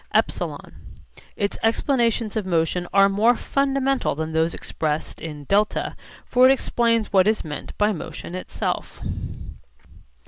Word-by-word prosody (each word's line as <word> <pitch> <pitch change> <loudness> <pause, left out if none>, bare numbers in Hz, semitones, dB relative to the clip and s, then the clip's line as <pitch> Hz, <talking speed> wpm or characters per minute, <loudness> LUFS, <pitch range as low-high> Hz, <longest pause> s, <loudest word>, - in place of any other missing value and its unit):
(ε) - - +7 1.1
Its 200 0 -2
explanations 230 -2 +1
of 215 - 0
motion 175 0 0
are 195 0 +6
more 215 +5 +3
fundamental 275 - 0
than 160 +1 -4
those 160 +1 +1
expressed 155 -1 -3
in 150 -3 -7
(δ); 205 +6 +1 0.3
for 255 +1 +5
it - - +7
explains 230 -5 +1
what 190 0 +5
is 215 0 +2
meant 150 -1 -7
by 210 +1 +3
motion 175 -1 -6
itself. 185 - -4
205 Hz, 130 wpm, -23 LUFS, 165-235 Hz, 1.1 s, ε